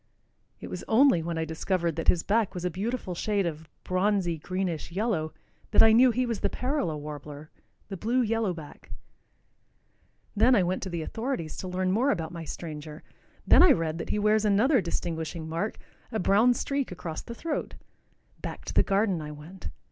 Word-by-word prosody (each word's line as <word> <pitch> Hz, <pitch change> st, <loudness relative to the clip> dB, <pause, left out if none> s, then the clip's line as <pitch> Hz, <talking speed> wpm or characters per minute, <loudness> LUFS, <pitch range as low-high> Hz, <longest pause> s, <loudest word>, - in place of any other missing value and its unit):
It -, -, -7 dB
was -, -, -5 dB
only 245 Hz, -5 st, +5 dB
when 165 Hz, 0 st, -3 dB
I 160 Hz, -, -1 dB
discovered 170 Hz, +1 st, -1 dB
that 165 Hz, -, -4 dB
his 170 Hz, -, +4 dB
back 215 Hz, -1 st, +1 dB
was 180 Hz, 0 st, -4 dB
a 180 Hz, -, 0 dB
beautiful 200 Hz, +1 st, -3 dB
shade 200 Hz, +2 st, 0 dB
of 160 Hz, -1 st, -5 dB
bronzy 185 Hz, -3 st, +1 dB
greenish 180 Hz, -1 st, -3 dB
yellow 185 Hz, -5 st, -1 dB, 0.4 s
that -, -, +6 dB
I 225 Hz, -, +7 dB
knew 245 Hz, +3 st, +7 dB
he 250 Hz, +2 st, +1 dB
was 230 Hz, -3 st, -2 dB
the -, -, 0 dB
parula 255 Hz, -, -1 dB
warbler, 150 Hz, 0 st, -8 dB, 0.4 s
the 195 Hz, -, -6 dB
blue 240 Hz, +7 st, +1 dB
yellow 225 Hz, -3 st, 0 dB
back. 160 Hz, -4 st, -10 dB, 1.5 s
Then 235 Hz, +5 st, +5 dB
I 195 Hz, -, +4 dB
went 180 Hz, +2 st, -1 dB
to 190 Hz, -, -4 dB
the 170 Hz, -2 st, -3 dB
authorities 225 Hz, -, -3 dB
to 185 Hz, -, -5 dB
learn 185 Hz, 0 st, -1 dB
more 240 Hz, +8 st, +2 dB
about 165 Hz, -, -1 dB
my 165 Hz, -1 st, -6 dB
stranger. 155 Hz, 0 st, -7 dB, 0.4 s
Then -, -, +7 dB
I 360 Hz, -4 st, +8 dB
read 165 Hz, -1 st, -2 dB
that -, -, -5 dB
he -, -, 0 dB
wears 215 Hz, +1 st, +3 dB
another 220 Hz, +6 st, +4 dB
distinguishing 165 Hz, -1 st, -4 dB
mark, 165 Hz, +7 st, -2 dB, 0.3 s
a 220 Hz, -, -1 dB
brown 215 Hz, +7 st, +4 dB
streak 275 Hz, -1 st, -2 dB
across 165 Hz, -3 st, -5 dB
the 235 Hz, -, -9 dB
throat. 315 Hz, +4 st, -3 dB, 0.7 s
Back -, -, -6 dB
to -, -, -5 dB
the -, -, +5 dB
garden 195 Hz, -4 st, +1 dB
I 150 Hz, -, -6 dB
went. 150 Hz, -, -9 dB
185 Hz, 185 wpm, -28 LUFS, 165-225 Hz, 1.5 s, I